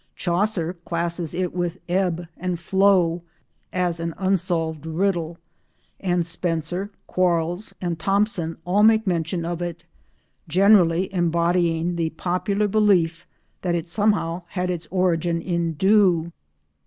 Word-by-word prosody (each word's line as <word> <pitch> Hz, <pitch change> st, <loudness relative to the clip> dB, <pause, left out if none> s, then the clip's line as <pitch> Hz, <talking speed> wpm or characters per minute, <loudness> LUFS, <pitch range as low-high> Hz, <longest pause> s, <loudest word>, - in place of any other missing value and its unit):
Chaucer 175 Hz, -1 st, 0 dB
classes 170 Hz, -1 st, -2 dB
it 180 Hz, 0 st, -2 dB
with 175 Hz, 0 st, -2 dB
"ebbe 175 Hz, -2 st, 0 dB
and 180 Hz, -1 st, -3 dB
floud" 180 Hz, -2 st, +3 dB, 0.5 s
as 180 Hz, -2 st, -1 dB
an 165 Hz, -1 st, -3 dB
unsolved 170 Hz, -5 st, -1 dB
riddle, 170 Hz, -1 st, -1 dB, 0.6 s
and 175 Hz, -3 st, 0 dB
Spenser, 175 Hz, +2 st, -2 dB, 0.2 s
Quarles 175 Hz, +2 st, 0 dB
and 170 Hz, -3 st, -3 dB
Thomson 195 Hz, -4 st, 0 dB
all 190 Hz, +4 st, +2 dB
make 220 Hz, +1 st, +5 dB
mention 170 Hz, -1 st, -1 dB
of 175 Hz, 0 st, -3 dB
it, 170 Hz, -1 st, -5 dB, 0.6 s
generally 185 Hz, 0 st, +4 dB
embodying 170 Hz, -1 st, +1 dB
the 165 Hz, -1 st, 0 dB
popular 185 Hz, +5 st, -1 dB
belief 190 Hz, -6 st, +2 dB, 0.3 s
that 175 Hz, -2 st, 0 dB
it 170 Hz, 0 st, -3 dB
somehow 185 Hz, -3 st, 0 dB
had 180 Hz, -1 st, -2 dB
its 175 Hz, -2 st, -5 dB
origin 175 Hz, -2 st, +1 dB
in 170 Hz, -1 st, -1 dB
dew. 185 Hz, -2 st, +3 dB
175 Hz, 120 wpm, -23 LUFS, 165-190 Hz, 0.6 s, make